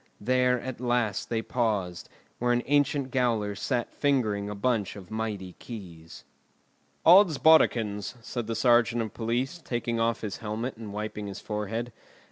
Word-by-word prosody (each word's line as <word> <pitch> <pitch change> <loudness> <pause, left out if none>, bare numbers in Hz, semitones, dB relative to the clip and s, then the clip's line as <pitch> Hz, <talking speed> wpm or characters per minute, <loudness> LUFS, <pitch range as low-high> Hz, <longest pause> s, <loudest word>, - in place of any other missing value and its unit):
There 125 +2 +2
at 130 0 -6
last 120 -5 0
they 115 -1 -1
paused, 105 -9 -1 0.3
where 120 0 +1
an 120 0 +2
ancient 145 -1 +1
gaoler 115 -5 +1
sat 120 +4 -2
fingering 110 -8 0
a 105 - -5
bunch 105 -1 0
of 95 -2 -11
mighty 105 -4 -4
keys. 85 -8 -10 0.8
"Oddsbodikins!" 155 - +5
said 120 0 -5
the 115 - -2
sergeant 120 -1 +3
of 110 - -7
police, 125 +8 -2
taking 120 -2 -2
off 115 0 +1
his 105 -3 -4
helmet 110 +4 -4
and 110 -2 -8
wiping 105 0 -4
his 100 - -6
forehead. 110 +2 -4
115 Hz, 145 wpm, -28 LUFS, 105-125 Hz, 0.8 s, Oddsbodikins